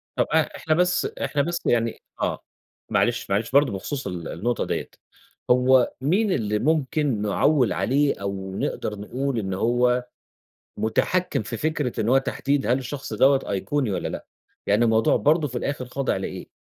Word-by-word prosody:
طَب - - +1
آآ، - - +3
إحنا 155 - 0
بس 180 +2 +2
إحنا 145 - -1
بس 170 +3 -3
يعني 115 -1 +1 0.2
آه، - - -1 0.5
معلش، 120 -2 +1
معلش 105 +4 0
برضه 140 -3 +4
بخصوص 130 +6 -4
ال 90 -4 -5
النقطة 120 +8 -2
ديَّة، - - -3 0.6
هو 125 0 +4
مين 190 +9 +2
اللي 105 -6 0
ممكن 150 -4 +1
نعوِّل 125 +6 +2
عليه، 140 -3 +1
أو 95 -1 -4
نقدر 105 +1 -3
نقول 125 +4 -2
إن 95 -3 -3
هو 125 +4 +2 0.7
مُتحكِّم 115 - 0
في 115 +2 -5
فكرة 150 -2 -1
إن 110 - 0
هو 130 +2 +5
تحديد 135 +1 -1
هل 125 +2 +3
الشخص 135 +2 -6
دوَّة 135 0 +4
أيقوني 125 +5 -1
والَّا 95 - -2
لأ؟ - - -7 0.4
يعني 105 +4 +3
الموضوع 110 -1 +3
برضه 150 +1 +2
في 125 -1 -4
الآخر 140 0 -3
خاضع 135 +2 -1
لإيه؟ - - -5
125 Hz, 165 wpm, -24 LUFS, 110-145 Hz, 0.7 s, هو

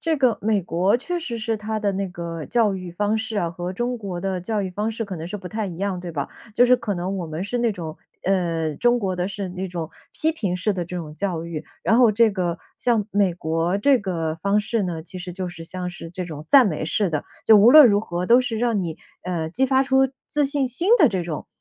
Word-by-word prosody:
这 325 -1 0
个 255 -5 +2
美 210 -2 +1
国 180 +5 +2
确 350 +8 -3
实 245 -8 -5
是 225 0 -1
它 215 +1 -3
的 205 -2 0
那 195 0 -2
个 170 -3 -6
教 225 -4 +2
育 185 -2 -6
方 210 +4 0
式 220 0 -4
啊， 170 -4 0
和 175 +2 -5
中 240 +3 -2
国 190 -4 -5
的 190 -1 -2
教 210 +2 -2
育 185 - -3
方 210 +4 -2
式 225 0 -4
可 195 -2 -6
能 160 +1 -6
是 210 - -4
不 190 -2 -9
太 215 -1 -3
一 175 -3 -7
样， 190 -1 -2
对 175 -1 -6
吧？ 140 -3 -3 0.3
就 245 - +6
是 250 0 +6
可 225 -4 -3
能 180 +2 -3
我 170 - -4
们 160 +4 -4
是 245 +5 -2
那 235 -1 +2
种 165 -5 -6 0.3
呃， 170 -5 0
中 240 0 +3
国 190 -4 -1
的 180 +2 -1
是 200 -1 -5
那 185 +1 -4
种 170 -3 -5 0.2
批 320 +1 0
评 195 - -2
式 205 +4 0
的 185 -2 -3
这 180 +2 -6
种 155 -3 -6
教 175 -2 -2
育， 165 -2 -5 0.2
然 225 - +3
后 240 -3 +6
这 225 +1 +4
个 180 -3 -2 0.2
像 230 -4 +1
美 195 -4 +2
国 165 +2 0
这 265 +5 +4
个 165 -6 -2
方 200 +5 +1
式 215 +1 -1
呢， 170 -4 -3
其 180 +2 -9
实 180 0 -6
就 185 -1 -3
是 165 -1 -10
像 180 +1 -5
是 165 - -9
这 180 +1 -5
种 155 -3 -8
赞 270 -4 +7
美 155 -4 -2
式 185 +4 0
的， 150 -2 -2 0.2
就 220 - +7
无 215 +4 +7
论 305 -1 +10
如 205 -3 +3
何 175 -4 -3
都 240 +6 +6
是 230 -3 -3
让 230 -3 +1
你， 165 -3 -4 0.3
呃， 170 -3 -2
激 260 +10 +1
发 265 0 +3
出 265 0 +3 0.2
自 295 0 +1
信 280 -1 0
心 255 +10 -2
的 305 - +7
这 190 -5 -2
种， 165 -3 -5
195 Hz, 280 characters per minute, -23 LUFS, 175-225 Hz, 0.3 s, 论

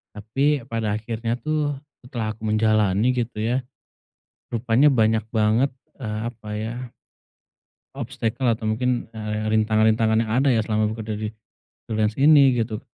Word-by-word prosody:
Tapi 130 +5 0
pada 110 -3 -1
akhirnya 115 +1 -3
tuh 150 +1 -1 0.2
setelah 115 -4 -4
aku 110 - -21
menjalani 110 +1 +2
gitu 120 -3 -3
ya, 120 +4 0 0.9
rupanya 120 +5 +3
banyak 110 -3 +2
banget, 110 +4 +2 0.3
eee, 110 -5 -4
apa 110 -3 -11
ya 115 +3 -5 1.0
obstacle 125 -1 -3
atau 115 -2 0
mungkin, 125 +1 -1
eee, 110 -1 -3
rintangan-rintangan 110 +1 +3
yang 110 - -5
ada 140 - +3
ya 110 - +2
selama 105 0 0
bekerja 110 -1 -5
di 110 0 -3 0.6
freelance 110 -1 0
ini 140 -2 +6
gitu, 110 -1 -1
115 Hz, 135 wpm, -23 LUFS, 110-125 Hz, 1.0 s, ini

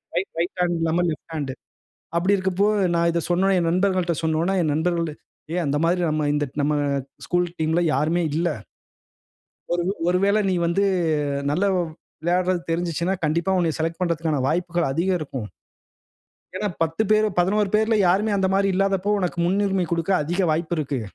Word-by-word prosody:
Right, 180 +3 -1
right 175 +3 -2
hand 175 -1 +1
இல்லாம 165 +2 +1
left 160 +1 -8
hand 140 -4 -3 0.6
அப்பிடி 185 +4 +3
இருக்கப்போ, 190 +1 +1 0.3
நான் 170 0 +3
இத 170 0 0
சொன்னவுனே, 190 +2 +3
என் 170 -1 +1
நண்பர்கள்ட்ட 185 -1 +1
சொன்னவுனே 160 +4 +1
,என் 155 -2 +1
நண்பர்கள் 170 +1 0 0.4
ஏ - - -1
அந்த 145 0 0
மாதிரி 180 +2 +1
நம்ம 155 0 0
இந்த 145 0 0 0.2
நம்ம 145 +1 +1 0.5
ஸ்கூல் 175 0 +1
டீம் 160 0 +1
ல - - +3
யாருமே 160 +6 +1
இல்ல. 170 +2 +1 1.2
ஒரு 175 - +1
உ - - 0 0.2
ஒருவேள 195 +3 +2
நீ - - +1
வந்து 170 +4 +1 0.7
நல்ல 175 +7 0 0.6
விளையாடுறது 180 +1 +1
தெரிஞ்சுச்சுன்னா, 170 +2 -1
கண்டிப்பா 165 +5 +1
உன்னைய 165 -3 +1
செலக்ட் 165 +1 -2
பண்றதுக்கான 165 -4 0
வாய்ப்புகள் 170 0 0
அதிகம் 180 +6 +1
இருக்கும். 135 -7 -5 1.1
ஏன்னா, 210 +2 -1
10 165 +5 0
பேரு 215 0 +4
11 200 +3 +2
பேர்ல 220 +1 +2
யாருமே 205 +4 +2
அந்த 190 -1 +1
மாதிரி 195 0 +2
இல்லாதப்போ! 195 +1 +1
உனக்கு 180 -2 -2
முன்னுரிமை 195 -1 +1
குடுக்க 170 +3 0
அதிக 175 +6 -2
வாய்ப்பு 165 +2 -1
இருக்கு. 140 -3 -2
175 Hz, 160 wpm, -23 LUFS, 160-190 Hz, 1.2 s, பேரு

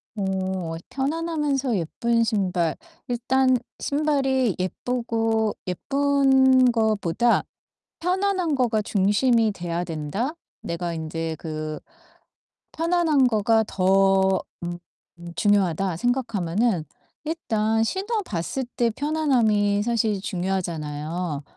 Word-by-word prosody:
어 190 -4 -2
편안하면서 285 - -1
예쁜 230 +8 0
신발. 185 -7 0 0.3
일단 255 +1 +2 0.2
신발이 270 - +1
예쁘고 225 +2 -1
예쁜 265 +3 +3
거보다 220 -1 +2 0.6
편안한 365 -2 0
거가 235 -4 +1
중심이 215 +3 +2
돼야 175 -2 -3
된다. 170 - -3 0.3
내가 170 0 -3
인제 160 0 -4
그 155 -1 -5 0.9
'편안한 325 -5 +2
거가 220 0 +3
더 190 0 +3 0.2
음 175 0 -4 0.6
중요하다.' 195 -4 +1
생각하면은 220 -5 0 0.4
일단 225 -9 0
신어 410 - -1
봤을 210 - -3
때 235 -1 +3
편안함이 230 -9 +1
사실 220 -4 0
중요하잖아요, 170 -5 -3
220 Hz, 210 characters per minute, -24 LUFS, 185-265 Hz, 0.9 s, 예쁜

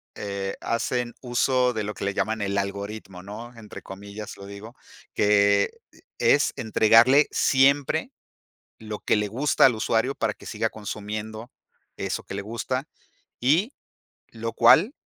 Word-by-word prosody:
eh, 100 -1 -4
hacen 120 +1 -1
uso 125 0 +1
de 110 -1 -2
lo 105 +1 -4
que - - -7
le 100 - -1
llaman 110 +2 -1
el 100 0 -1
algoritmo, 100 -1 -5
¿no? 115 +4 -9
Entre 110 -2 -10
comillas 100 +2 -9
lo 100 - -10
digo, 100 +4 -10 0.4
que, 100 -1 +3 0.2
eh, - - -21 0.2
es - - +3
entregarle 115 +6 +5
siempre 140 +1 +2 0.7
lo 110 -1 -6
que - - +2
le 105 0 0
gusta 130 +8 +2
al 125 - +3
usuario, 115 +4 0
para - - -1
que - - -16
siga - - -2
consumiendo 110 +2 -6 0.5
eso - - -3
que - - -8
le 100 - -3
gusta, 115 +5 -3 0.6
y 165 - +2 0.6
lo 115 0 -5
cual 175 - +5
110 Hz, 145 wpm, -25 LUFS, 100-125 Hz, 0.7 s, entregarle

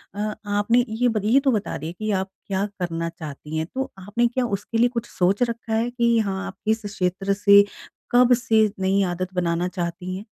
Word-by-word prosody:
अ, 210 +1 -2
आपने 205 +4 +2
ये 225 +3 +1
बत 215 -3 -1
ये 240 +6 +5
तो 275 -1 +2
बता 215 -4 -2
दिए 160 +4 -6
कि 215 0 -1
आप 190 -1 -1 0.2
क्या 195 0 0
करना 165 -2 -2
चाहती 155 -2 -7
हैं, 160 - -1
तो 265 +1 -2
आपने 210 +5 +1
क्या 250 +1 -1
उसके 210 +3 -5
लिए 240 +2 +4
कुछ 235 -2 -3
सोच 190 +6 +1
रखा 230 -1 -4
है 225 +2 +1
कि 235 -1 +2
हाँ, 195 -2 -2
आप 195 - -8
किस 220 0 0
क्षेत्र 195 0 -1
से, 200 0 +6 0.5
कब 250 0 +6
से 225 -3 +3
नई 190 +1 +2
आदत 185 +1 -3
बनाना 175 -1 0
चाहती 180 0 -4
हैं? 200 - -9
205 Hz, 210 wpm, -23 LUFS, 185-230 Hz, 0.5 s, से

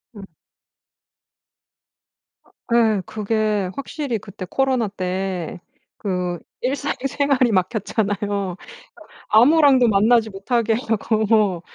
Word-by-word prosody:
음. 200 - -10 2.2
어 - - -28 0.2
예, 220 -4 +3
그게 215 -2 -1
확실히 275 -3 -3
그때 200 -2 -9
코로나 260 -4 +1
때 185 -3 -4 0.4
그 180 -3 -2 0.2
일상생활이 275 -1 0
막혔잖아요. 200 -1 -1 0.7
아무랑도 260 +1 +5
만나지 220 +2 +3
못하게 225 +3 -1
하고 220 -1 0
뭐, 205 -6 +2
215 Hz, 195 characters per minute, -21 LUFS, 195-245 Hz, 2.2 s, 아무랑도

